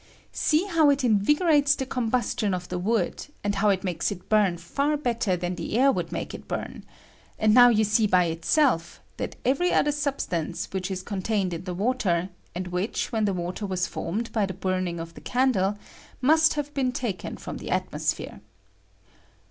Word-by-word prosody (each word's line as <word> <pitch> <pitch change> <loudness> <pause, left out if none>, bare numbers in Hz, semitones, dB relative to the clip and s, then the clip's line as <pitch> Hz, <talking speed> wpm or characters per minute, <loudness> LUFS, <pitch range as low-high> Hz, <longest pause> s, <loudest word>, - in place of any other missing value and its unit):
] - - -30
See 315 +2 +2
how 330 -6 +4
it 280 -1 +2
invigorates 290 - +3
the 265 - -3
combustion 235 -5 0
of 180 0 -7
the 180 - -3
wood, 200 0 -1 0.2
and 205 0 0
how 205 +1 +2
it 190 -2 +1
makes 175 0 -1
it 190 -3 -8
bum 205 -5 +3
far 280 - -1
better 235 -9 0
than 175 +1 -3
the 190 +4 -3
air 270 +2 +5
would - - -3
make - - -4
it - - -9
bum; - - -5 0.6
and 215 0 +3
now 245 +1 +8
you 220 -2 +3
see 215 +1 +3
bj 180 -3 +3
itself 170 - +1 0.2
that - - -4
every 315 +8 +2
other 295 - +3
substance 270 - -2
which 190 0 -3
is 185 -1 -4
contained 195 -1 -1
iu 165 - -3
the 180 0 -5
water, 195 -5 0 0.3
and 180 0 -4
which, 180 +5 -2
when 220 -2 +1
the 200 - +1
water 180 +4 -4
was 185 -1 0
formed 215 +6 -4
by 215 -3 +1
the 190 - -6
burning 185 -2 -2
of 165 0 -7
the - - -12
candle, 215 -6 +1 0.4
must 315 +5 +4
have 290 0 -3
been 265 -3 0
taken 225 -8 -4
from - - -7
the - - -7
atmosphere. - - -2
210 Hz, 190 wpm, -26 LUFS, 180-260 Hz, 0.6 s, now